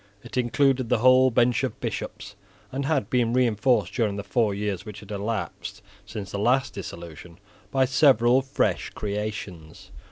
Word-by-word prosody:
It 120 -1 -10
included 130 0 +1
the - - +3
whole 130 +2 +5
bench 120 +1 +2
of 130 -4 -3
Bishops, - - -5 0.4
and 135 +1 -3
had 145 -9 0
been 120 -2 +2
reinforced 115 -4 +2
during 110 -5 0
the 100 - -5
four 110 +1 +1
years 100 -2 -3
which 105 -2 -9
had 105 0 -12
elapsed 105 +2 -4 0.2
since 105 -4 -7
the 100 - -3
last 130 +5 +2
dissolution, 85 -2 -9 0.3
by 135 -1 +2
several 130 -2 +4
fresh 135 +1 -1
creations. 100 -6 -6
115 Hz, 155 wpm, -25 LUFS, 100-130 Hz, 0.4 s, whole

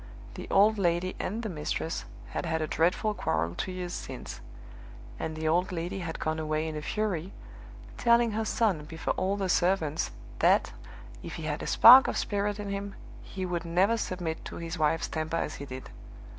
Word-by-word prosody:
The - - -8
old 210 +2 +4
lady 175 0 +1
and 225 +5 -3
the - - -2
mistress 160 -1 -3 0.2
had - - -3
had 160 0 0
a 155 - 0
dreadful 175 +8 +1
quarrel 85 - -1
two 185 - -4
years 180 -1 -5
since; - - -7 0.8
and 160 - -3
the 155 0 -2
old 175 +4 +2
lady 180 +3 -3
had 165 -3 -4
gone 155 0 -1
away 155 0 -1
in 155 - -4
a 150 - -4
fury, 195 0 -2 0.6
telling 235 -1 +4
her 220 +1 -1
son, 205 -9 +1
before 160 +2 -3
all 195 +2 -1
the 195 -1 -1
servants, 175 -4 +1 0.3
that, - - +3 0.5
if - - -7
he - - -6
had - - -2
a - - -4
spark 255 +3 +9
of - - -1
spirit 205 0 -1
in 205 -1 -4
him, 200 0 -4 0.3
he 190 -1 -5
would 175 -2 -2
never 185 +7 +2
submit 175 -7 -3
to - - -7
his 165 0 -5
wife's 155 +1 +1
temper 160 +1 -2
as 150 - -3
he 140 - -7
did. 130 -1 -8
175 Hz, 190 wpm, -29 LUFS, 160-200 Hz, 0.8 s, spark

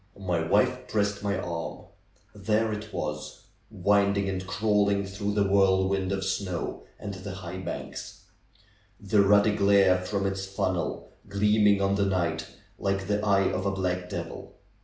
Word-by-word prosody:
My 90 -4 -1
wife 125 +9 +1
pressed 100 -1 0
m}^ 100 -2 -1
arm. 85 -1 -5 0.5
There 110 +2 0
it 105 +1 -6
was! - - -5 0.3
Winding 100 +1 +2
and 95 -1 -4
crawling 100 0 +1
through 100 +1 -3
the 100 -1 +2
whirlwind 95 -1 +2
of 95 -1 -1
snow 95 -2 -3
and 100 -1 -5
the 95 0 -7
high 90 -1 -7
banks; 90 -2 -7 0.8
the 100 0 +3
ruddy 105 +1 +4
glare 100 -2 +4
from 100 +2 -2
its 95 0 -2
funnel 95 -3 -2 0.2
gleaming 105 0 +3
on 100 0 +2
the 100 0 +2
night 85 -4 -1 0.3
like 100 0 -1
the 105 +1 -1
eye 100 -2 +3
of 95 +1 -2
a - - +1
black 90 -2 -2
devil. - - -6
100 Hz, 150 wpm, -27 LUFS, 95-100 Hz, 0.8 s, ruddy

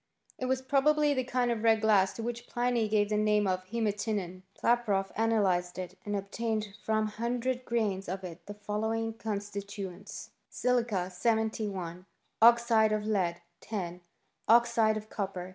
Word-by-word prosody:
It 255 - -2
was 260 0 0
probably 295 +2 +3
the 260 -2 0
kind 250 -1 0
of 230 -2 -2
red 225 -1 +4
glass 205 -3 +4
to 225 - -6
which 240 +1 -4
Pliny 240 -2 0
gave 205 -1 +2
the 210 - +1
name 210 0 +3
of 185 -1 0
heematinon* 205 -3 -2 0.2
Klaproth 210 -5 +1
analyzed 195 -6 +1
it, 185 -1 -6
and 205 0 -2
obtained 215 +2 -2
from 220 0 +1
100 240 +4 -2
grains 205 -6 -1
of 190 +1 -4
it 175 -2 -8
the 205 - -7
following 220 +2 -2
constituents: 200 -3 -6 0.2
Silica 230 -7 0
71 200 -4 -1 0.3
Oxide 230 -2 +6
of 215 0 0
lead 180 -5 0 0.2
10 180 -5 -5 0.5
Oxide 230 -2 +4
of 215 0 -7
copper 190 -3 -4
215 Hz, 145 wpm, -30 LUFS, 195-235 Hz, 0.5 s, Oxide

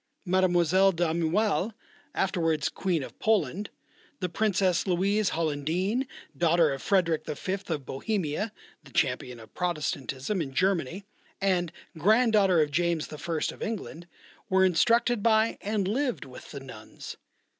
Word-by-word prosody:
Mlle. 185 +1 +4
D'Aumale, 175 +6 +1 0.4
afterwards 165 -5 +1
Queen 175 -6 -1
of - - -10
Poland, 205 -2 +1 0.5
the 180 -2 -2
Princess 190 -1 +1
Louise 195 +3 +2
Hollandine, 170 - -1 0.3
daughter 170 -3 +3
of 135 - -6
Frederick 175 -5 +2
V. 150 +5 -4 0.2
of 145 -4 -2
Bohemia 185 - -2 0.3
(the - - -15
champion 125 -3 0
of 110 -1 -14
Protestanism 155 - -2
in 135 -4 -5
Germany) 185 +1 0 0.3
and 180 -4 +1 0.2
grand 220 +7 +4
daughter 190 -6 +5
of 145 - -4
James 170 0 0
I. 155 +1 -3
of - - -16
England, 190 -6 -5 0.4
were 190 0 +4
instructed 230 +5 +3
by 220 0 +3
and 205 -2 -1
lived 250 +4 -1
with 130 - -12
the 140 - -7
nuns. 110 -5 -10
180 Hz, 130 wpm, -28 LUFS, 155-200 Hz, 0.5 s, daughter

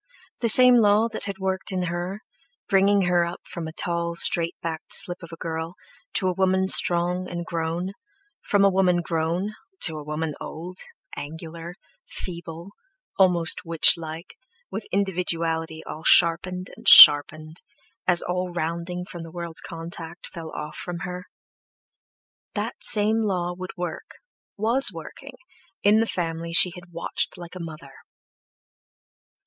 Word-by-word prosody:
The 230 - +1
same 250 +2 +7
law 215 +1 +3
that 225 - -7
had 200 -2 -6
worked 190 0 -3
in 185 -1 -2
her, 180 +5 -5 0.4
bringing 200 0 +3
her 175 -1 +2
up 170 +1 -6
from 165 -2 -7
a - - -7
tall, 170 +1 -2
straight 170 0 +2
backed 160 -1 -6
slip 175 0 +2
of 170 -1 -12
a - - -8
girl 165 +1 -5 0.4
to 190 - 0
a 185 - 0
woman 190 +1 +1
strong 180 0 +3
and 175 0 -6
grown, 170 +2 -4 0.5
from 200 -1 +2
a - - +5
woman 180 -2 +1
grown 170 +5 -2 0.3
to 160 -3 +3
a - - -9
woman 150 +1 -4
old, 180 +4 -8 0.4
angular, 165 +3 -9 0.3
feeble, 170 0 -8 0.5
almost 175 -3 +2
witchlike, 165 0 +1 0.4
with 200 +3 -6
individuality 165 -4 -2
all 155 - -9
sharpened 180 +3 +3
and - - -12
sharpened, 155 +2 +8 0.5
as 175 -1 +4
all 180 0 -3
rounding 170 +2 -4
from 175 -2 -9
the 165 - -9
world's 170 -1 -4
contact 165 +1 -9
fell 165 -2 -9
off 150 0 -8
from 175 -1 -7
her—that 180 0 -11
same 215 +1 +2
law 180 -4 -2
would 185 +1 -9
work, 175 -2 -7 0.4
was 230 +6 +6
working, 220 - -11 0.5
in 210 +2 +4
the 225 - 0
family 165 -3 -4
she 180 +1 +7
had 175 -1 -14
watched 170 0 -3
like 175 -1 -11
a - - -8
mother. 155 -5 -10
175 Hz, 145 wpm, -23 LUFS, 165-185 Hz, 0.5 s, sharpened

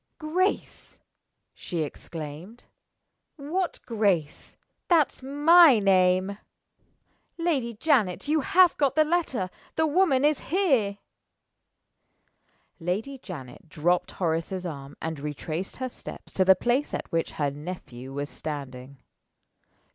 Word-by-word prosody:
"Grace!" 350 +5 -2 0.5
she 170 -4 -3
exclaimed. 160 +8 -8 0.7
"What 335 +5 -3
Grace? 200 -10 -1 0.3
That's 325 -7 +2
my 295 +1 +6
name. 190 0 +2 1.0
Lady 280 -9 -1
Janet, 225 - +1
you 310 +1 +2
have 360 +5 +5
got 280 -3 +1
the 310 - +5
letter! 300 - -1 0.2
The 320 - +2
woman 300 -4 +3
is 300 -1 +3
here!" 270 - +2 1.8
Lady 210 +11 -3
Janet 150 - -10
dropped 175 +4 +1
Horace's 175 +2 -2
arm, 140 -4 -7
and 160 -2 -3
retraced 155 +5 -5
her 260 0 -4
steps - - -10
to 190 - +3
the 190 0 +6
place 245 +9 0
at - - -6
which 165 0 -1
her 145 -2 -1
nephew 140 -5 -8
was 145 +1 -3
standing. 135 -3 -7
195 Hz, 110 wpm, -26 LUFS, -, 1.8 s, my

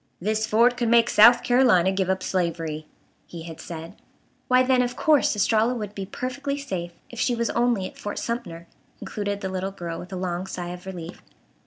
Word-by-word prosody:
"This 215 +3 -1
fort 240 +3 +4
could 235 -2 0
make 235 0 +4
South 235 +3 +7
Carolina 235 -8 +4
give 190 -1 -1
up 190 0 0
slavery," 165 -4 -2 0.4
he 170 -2 -8
had 165 -1 -9
said. 165 +1 -8 0.5
Why, 255 0 +5
then, 255 -1 +3
of 245 0 -2
course 300 -7 +3
Estralla 220 +4 +2
would 210 -3 -5
be 195 -2 -6
perfectly 280 +6 -4
safe 185 -11 -5 0.2
if 240 - -8
she 245 - +1
was 235 0 -1
only 235 -5 +1
at - - -9
Fort 205 - -5
Sumter, 190 -8 -4 0.3
concluded 205 -1 -4
the 190 - -3
little 190 +1 -3
girl, 170 -4 -6
with 180 - -10
a - - -4
long 180 0 -3
sigh 175 -2 -5
of 180 +1 -9
relief. 175 -2 -8
200 Hz, 195 wpm, -24 LUFS, 180-240 Hz, 0.5 s, South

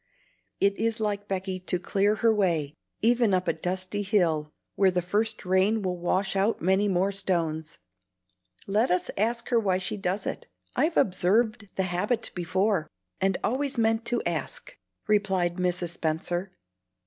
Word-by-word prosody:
It 200 0 +3
is 225 0 0
like 205 -1 -2
Becky 190 -1 -3
to 180 0 -1
clear 200 +4 +1
her 225 0 +3
way, 170 -8 +1 0.3
even 230 -3 +4
up 185 0 -1
a - - +3
dusty 185 +4 -3
hill 170 -7 +1 0.2
where 195 -1 +4
the 180 -1 0
first 215 +4 0
rain 190 +4 +2
will 180 -1 -1
wash 190 +3 0
out 200 +4 +1
many 190 +3 +2
more 190 +1 +1
stones. 165 -5 -2 0.9
Let 210 +5 +1
us 180 0 +1
ask 235 +3 -1
her 240 -2 +4
why 190 -4 +1
she 190 +3 -3
does 195 0 -2
it. - - -5 0.3
I've 320 +2 +1
observed 215 +4 +2
the 190 - +1
habit 195 +6 -1
before, 185 0 0 0.3
and 195 -1 +1
always 270 +3 -1
meant 225 0 +2
to 240 0 0
ask," - - -4 0.3
replied 190 -4 +1
Mrs. 180 -1 0
Spenser. 175 +3 -2
195 Hz, 155 wpm, -27 LUFS, 180-215 Hz, 0.9 s, even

